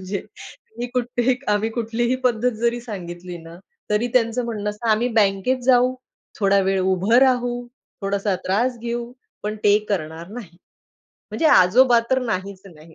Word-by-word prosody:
म्हणजे 190 +1 -4 0.6
मी 245 - -2
कुठलीही 245 0 0 0.2
आम्ही 210 +2 0
कुठलीही 235 +2 -1
पद्धत 245 0 +2
जरी 235 0 0
सांगितली 180 -5 -7
ना, 165 +1 -12 0.3
तरी 210 +3 +1
त्यांचं 235 0 +2
म्हणणं 210 -3 -3
असतं, 225 +2 -5
"आम्ही 230 +3 +2
बँकेत 200 +6 +1
जाऊ, 255 0 +4 0.5
थोडा 200 0 +4
वेळ 190 0 +1
उभं 190 +4 +1
राहू, 245 -2 +1 0.4
थोडासा 200 0 0
त्रास 240 +6 0
घेऊ, 235 +1 -4 0.3
पण 210 +1 -3
ते 205 0 +5
करणार 165 -2 -3
नाही." 205 -7 -10 0.7
म्हणजे 325 - 0
आजोबा 240 +2 +6
तर 260 - +3
नाहीच 195 -4 -4
नाही. 160 -2 -16
220 Hz, 150 wpm, -22 LUFS, 190-245 Hz, 0.7 s, आजोबा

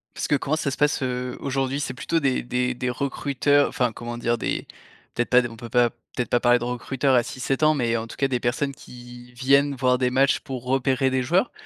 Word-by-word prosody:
Parce - - -3
que 145 - +3
comment 140 +2 0
ça 145 -3 -2
se - - -5
passe, 145 -1 +2
heu, 125 0 -3
aujourd'hui? 135 0 -1
C'est 145 - -3
plutôt 165 +6 -1
des 135 -3 +1
des 125 0 -1
des 125 0 -3
recruteurs, 140 +2 +1
enfin, 125 -2 0
comment 120 0 -6
dire? 120 0 0
Des, - - -3 0.5
peut-être 120 - -1
pas 125 0 +6
des, 120 - -4
on 115 - -11
peut 120 -1 -9
pas, 120 +1 +3 0.3
peut-être 125 - -2
pas 120 - +3
parler 120 0 +4
de - - -5
recruteurs 130 +2 0
à 120 - +4
6-7 135 +4 -3
ans, 155 0 +5
mais 120 -3 0
en 115 0 -3
tout - - -10
cas 135 - +2
des 125 -2 -1
personnes 135 +4 -1
qui 125 -2 -13
viennent 140 +3 +3
voir 125 -1 +2
des 125 -1 +1
matchs 135 +2 +3
pour 130 -3 -7
repérer 130 0 +1
des 130 0 0
joueurs? 175 - +1
125 Hz, 240 wpm, -24 LUFS, 120-140 Hz, 0.5 s, pas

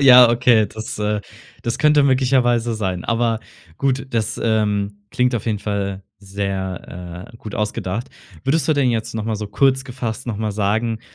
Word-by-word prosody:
Ja, 125 -3 +9
okay, 120 -2 +4
das, 110 +1 -6
äh 105 0 0 0.4
das 120 - -2
könnte 150 -1 +5
möglicherweise 125 -3 +3
sein. 95 -4 -2
Aber 115 -1 +1 0.4
gut, 135 -1 0
das, 115 -3 -1
ähm, 105 -2 0
klingt 125 0 +1
auf 115 - -2
jeden 110 -3 0
Fall 100 -1 -3 0.2
sehr, 95 -2 -5
äh, - - -10
gut 110 -2 -8
ausgedacht. 105 +1 -2 0.4
Würdest 150 +4 +2
du 155 - +4
denn 140 -4 +2
jetzt 115 -2 -2
noch 110 -1 -2
mal 110 -1 -1
so 105 - -4
kurz 130 +5 +2
gefasst 120 -4 -4
noch 115 -4 -2
mal 110 -1 -1
sagen, 110 +3 0
110 Hz, 170 wpm, -21 LUFS, 100-125 Hz, 0.4 s, Ja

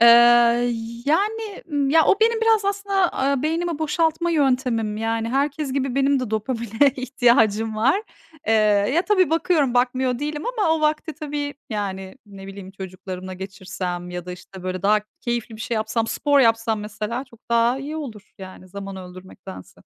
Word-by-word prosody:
Eee, 235 - +8 1.0
yani, 415 +6 0
ımm, 280 -2 +1
ya, 320 0 +5
o 390 - +3
benim 455 0 +3
biraz 450 -2 +3
aslında, 395 -2 +1
aaa, 275 0 0
beynimi 330 +1 -1
boşaltma 320 +2 0
yöntemim. 250 -8 +1
Yani, 225 +1 -1
herkes 275 +2 -1
gibi 270 -2 -1
benim 275 0 +2
de 250 -4 -4
dopamine 230 +3 +1
ihtiyacım 235 -4 +2
var. 270 - +2 0.4
Eee, 220 - +2 0.4
ya, 340 - +3
tabii, 375 -6 +3
bakıyorum, 320 -5 +2
bakmıyor 250 0 +1
değilim 295 +1 -4
ama 450 -8 0
o - - -5
vakti 310 +1 0
tabii, 290 -2 -4 0.2
yani, 195 -2 -4
ne 195 -1 -11
bileyim, 195 -1 -9
çocuklarımla 185 -1 -8
geçirsem 185 -2 -6
ya 180 0 -6
da, 180 - -5
işte, 185 +1 -12
böyle, 185 -1 -4
daha 210 +1 +4 0.2
keyifli 235 -2 -3
bir - - -13
şey 235 - -2
yapsam, 220 +1 -1
spor 285 +3 +2
yapsam, 225 -2 +2
mesela, 215 +4 -4
çok 235 -4 -20
daha 235 +2 +3
iyi 290 +3 -5
olur, 225 -10 -8
yani, 185 -1 -11
zaman 195 +1 -7
öldürmektense. 180 - -11
245 Hz, 160 wpm, -22 LUFS, 210-300 Hz, 1.0 s, Eee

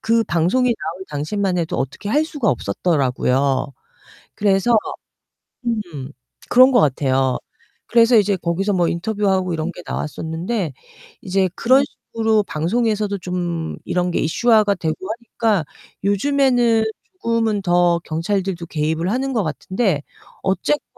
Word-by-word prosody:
그 230 0 +2
방송에 185 +10 +2
나올 180 -2 -6
당시만 180 +6 -1
해도 165 -1 -2
어떻게 135 +9 -4
할 300 +7 +2
수가 290 -8 -2
없었더라고요. 135 - 0 0.6
그래서 205 +3 +3 0.9
음 170 - -3 0.4
그런 255 +2 +7
것 240 - +5
같아요. 130 -2 +1 0.5
그래서 235 0 +5
이제 205 -1 +2
거기서 185 +4 -1
뭐 175 -3 +2
인터뷰하고 190 0 0
이런 160 +2 -2
게 - - -10
나왔었는데 165 - -3 0.5
이제 190 0 +1
그런 260 +3 +4 0.3
식으로 220 -2 +2
방송에서도 210 +5 0
좀 175 -3 -3
이런 180 0 0
게 - - 0
이슈화가 215 +4 +3
되고 160 -2 -1 0.2
하니까 225 -5 -1 0.4
요즘에는 240 +1 +3 0.4
조금은 225 -3 +1
더 175 -1 +3
경찰들도 175 +1 -2
개입을 160 +3 -1
하는 265 +4 -1
것 230 -4 +1
같은데 185 +1 -1 0.4
어쨌건 195 +10 0
190 Hz, 300 characters per minute, -20 LUFS, 165-225 Hz, 0.9 s, 그런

